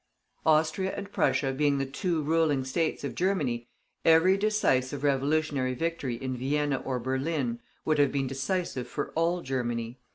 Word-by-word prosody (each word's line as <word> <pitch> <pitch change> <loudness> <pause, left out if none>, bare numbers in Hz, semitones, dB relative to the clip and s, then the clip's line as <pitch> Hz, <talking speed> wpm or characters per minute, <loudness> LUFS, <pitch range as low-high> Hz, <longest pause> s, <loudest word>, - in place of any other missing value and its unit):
Austria 160 +5 +2
and 200 0 -6
Prussia 135 -8 +1
being 145 +1 +2
the 135 - 0
two 160 +4 -1
ruling 155 -3 +2
states 155 +4 -1
of 140 - -3
Germany, 145 -11 0 0.4
every 165 +4 +6
decisive 145 -10 +1
revolutionary 140 -1 +1
victory 165 -4 -2
in 130 +2 -4
Vienna 140 +2 0
or 130 0 -3
Berlin 130 0 -1 0.3
would 155 -1 +2
have 140 -2 +4
been 140 -1 0
decisive 135 0 -2
for 145 - -4
all 170 +2 +1
Germany. 120 -2 -3
145 Hz, 150 wpm, -28 LUFS, 130-165 Hz, 0.4 s, every